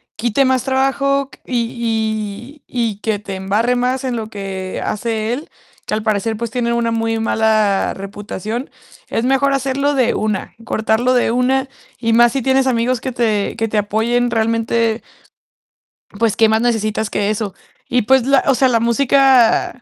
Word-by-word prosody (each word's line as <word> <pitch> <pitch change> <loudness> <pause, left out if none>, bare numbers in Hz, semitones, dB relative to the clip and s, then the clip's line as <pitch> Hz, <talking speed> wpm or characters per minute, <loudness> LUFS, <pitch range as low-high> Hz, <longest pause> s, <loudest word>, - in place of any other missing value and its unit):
quite 240 +4 +1
más 260 -1 +1
trabajo 270 +1 +1
q - - -16
y 230 +1 -3
y 235 -2 -1
y 200 - -19
que 220 -2 0
te 195 -2 -6
embarre 210 +6 0
más 250 +2 0
en 250 -2 -1
lo 220 -2 -4
que 190 -2 -5
hace 220 +1 -2
él, 290 +5 -6 0.4
que - - -4
al 215 - -3
parecer, 215 +1 0
pues, 235 0 -3
tiene 240 -2 -1
una 235 -1 0
muy 225 0 -1
mala 215 -3 +1
reputación. 205 +4 -6 0.4
Es 230 - -1
mejor 270 +1 +2
hacerlo 275 +2 0
de 250 -3 +2
una, 210 -2 -2
cortarlo 225 +3 +1
de 245 -2 +2
una 260 +2 +1 0.3
y 230 -1 +1
más 240 0 +5
si 270 - -1
tienes 265 0 +2
amigos 240 0 +1
que 260 - -3
te 220 -4 0
que 225 -1 0
te 215 - -2
apoyen 235 +4 0
realmente 230 0 0 1.2
pues, 225 -1 +1
¿qué 225 -1 +4
más 220 +1 +2
necesitas 220 -2 0
que 205 0 -1
eso? 210 -2 -2 0.3
Y 245 0 +2
pues, 260 +2 +3
la 275 0 +3
o 270 - +4
sea, 265 - +3
la 235 -2 +2
música 250 0 +3
230 Hz, 175 wpm, -18 LUFS, 220-255 Hz, 1.2 s, más